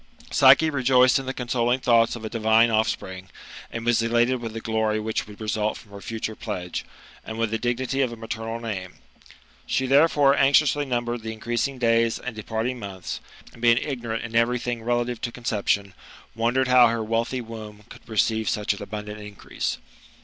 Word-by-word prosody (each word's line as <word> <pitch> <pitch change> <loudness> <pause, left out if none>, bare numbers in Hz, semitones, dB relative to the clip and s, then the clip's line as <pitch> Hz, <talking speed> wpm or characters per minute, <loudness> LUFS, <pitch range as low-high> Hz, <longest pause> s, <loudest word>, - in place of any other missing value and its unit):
Psyche 160 -1 +6
rejoiced 130 -2 +4
in 135 - -7
the - - 0
consoling 125 -1 0
thoughts 115 -2 +3
of 115 -2 -7
a - - -3
divine 115 +1 +3
offspring, 95 -4 -1 0.4
and 115 0 -5
was 120 -1 +3
elated 120 +2 +2
with 115 -2 -5
the 115 - -4
glory 110 -1 0
which 110 0 -2
would 105 -1 -12
result 105 0 -1
from 105 - -16
her 100 0 -10
future 110 0 -4
pledge, 90 -6 -5 0.4
and 110 - -7
with 115 -1 0
the 115 - -1
dignity 125 +3 -1
of 130 -3 +1
a - - -6
maternal 115 0 -5
name. 100 -6 -5 0.7
She, 130 - 0
therefore, 140 0 +4
anxiously 145 +1 +4
numbered 120 -2 -2
the 110 0 -5
increasing 120 +4 -2
days 115 -1 +2
and 125 -2 -6
departing 110 +3 -3
months, 95 -3 -6 0.3
and 115 - -15
being 120 -1 +5
ignorant 120 -5 -3
in 115 0 -7
every 115 +2 +3
thing 120 -1 -3
relative 120 0 -1
to 120 - -3
conception, 100 -4 -1 0.4
wondei; 120 +3 +1
jed 130 - +1
how 125 -1 +7
her 115 -1 -1
wealthy 115 +3 -1
womb 110 -3 -9
could - - -14
receive 110 0 +1
such 105 -1 0
an 100 - -10
abundant 105 0 -6
increase. 105 -1 -5
115 Hz, 185 wpm, -24 LUFS, 110-125 Hz, 0.7 s, how